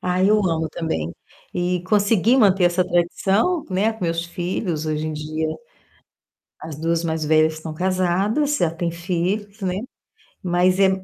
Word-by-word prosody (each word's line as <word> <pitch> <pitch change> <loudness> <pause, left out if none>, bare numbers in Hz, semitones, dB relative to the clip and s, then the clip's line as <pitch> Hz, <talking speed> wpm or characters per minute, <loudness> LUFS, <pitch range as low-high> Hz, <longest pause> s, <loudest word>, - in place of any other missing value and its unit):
Ah, 180 0 0
eu 210 +2 +5
amo 160 -1 -1
também. 85 - -3 0.4
E 180 0 -1
consegui 210 +4 +3
manter 195 -6 +4
essa 175 +1 +3
tradição, 195 - +1
né, 200 +4 +1
com 220 -4 -6
meus 165 0 -1
filhos. 175 -2 -3
Hoje 155 0 -1
em - - -3
dia, 155 +1 -3 1.1
as 155 -2 -7
2 165 +1 0
mais 160 -1 -1
velhas 155 +1 +3
estão 155 0 -7
casadas, 190 - +1
já 170 - +2
têm 170 +1 -3
filhos, 190 +5 -3
né, 185 -2 -1 0.7
mas 180 +1 +2
é 195 -1 +6
175 Hz, 150 wpm, -22 LUFS, 160-195 Hz, 1.1 s, é